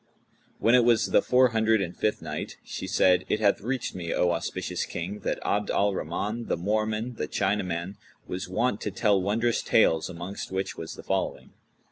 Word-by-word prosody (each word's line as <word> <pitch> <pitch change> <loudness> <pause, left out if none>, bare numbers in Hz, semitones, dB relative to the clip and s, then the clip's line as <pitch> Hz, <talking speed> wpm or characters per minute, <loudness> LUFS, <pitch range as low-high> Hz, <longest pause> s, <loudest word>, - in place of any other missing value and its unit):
When 115 - +3
it 125 -1 +6
was 120 -1 +3
the - - +5
Four 130 0 +4
Hundred 110 -1 +2
and 90 -2 -3
Fifth 105 -5 -1
Night, 75 -1 -5
She - - -6
said, 90 -1 +4
It - - +1
hath 100 -2 +3
reached 125 +4 -2
me, 85 -2 -4
O 90 - +2
auspicious 90 +1 -2
King, 95 +5 -5
that - - -2
Abd 105 0 0
al 100 0 +2
Rahman, 105 +8 -3
the - - 0
Moorman, 110 +5 -1
the - - -2
Chinaman, 95 -2 -1 0.3
was 90 0 -5
wont 110 +3 0
to - - -2
tell 100 -1 +2
wondrous 115 +5 +1
tales 80 +2 +3
amongst 90 +3 -6
which 95 0 -2
was 80 - -7
the - - -10
following. - - -2
100 Hz, 185 wpm, -27 LUFS, 90-110 Hz, 0.3 s, it